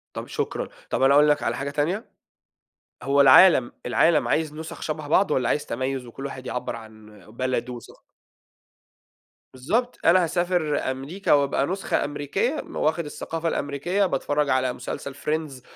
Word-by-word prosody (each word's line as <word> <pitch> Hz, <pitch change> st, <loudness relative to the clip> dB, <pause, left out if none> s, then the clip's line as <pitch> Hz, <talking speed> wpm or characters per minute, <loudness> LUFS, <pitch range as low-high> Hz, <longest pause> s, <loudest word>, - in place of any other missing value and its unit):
طَب -, -, -6 dB
شكرًا، -, -, -3 dB, 0.2 s
طَب -, -, -1 dB
أنا 135 Hz, +1 st, +5 dB
أقول 150 Hz, +1 st, +6 dB
لك 145 Hz, -, +2 dB
على -, -, 0 dB
حاجة 140 Hz, +1 st, -3 dB
تانية، 165 Hz, +10 st, -1 dB, 1.0 s
هو 140 Hz, +1 st, +2 dB
العالم، 135 Hz, -1 st, +7 dB
العالم 150 Hz, +5 st, +3 dB
عايز 155 Hz, -1 st, 0 dB
نُسَخ 160 Hz, +1 st, -8 dB
شبه 155 Hz, -1 st, -4 dB
بعض؟ 185 Hz, +2 st, +3 dB
والَّا 125 Hz, -4 st, +1 dB
عايز 150 Hz, -, 0 dB
تَميُّز، 130 Hz, +1 st, -3 dB
وكُلّ 135 Hz, +4 st, -7 dB
واحد 130 Hz, -2 st, -8 dB
يعبّر 125 Hz, -, -4 dB
عن 110 Hz, -2 st, -14 dB
بلدُه 125 Hz, +1 st, -2 dB
وث 120 Hz, -, -9 dB, 1.7 s
بالضّبط، 225 Hz, -, -1 dB
أنا 180 Hz, +2 st, +5 dB
هاسافر 170 Hz, -5 st, 0 dB
أمريكا، 145 Hz, +10 st, -1 dB
وأبقى 140 Hz, -1 st, +2 dB
نسخة 190 Hz, +2 st, -1 dB
أمريكية، 145 Hz, -, -2 dB
واخد 160 Hz, +1 st, 0 dB
الثقافة 165 Hz, +2 st, -5 dB
الأمريكية، 165 Hz, +9 st, -1 dB
باتفرّج 145 Hz, -4 st, 0 dB
على 130 Hz, -1 st, +1 dB
مسلسل 140 Hz, +2 st, -6 dB
Friends، 150 Hz, -3 st, -3 dB
145 Hz, 150 wpm, -24 LUFS, 130-165 Hz, 1.7 s, العالم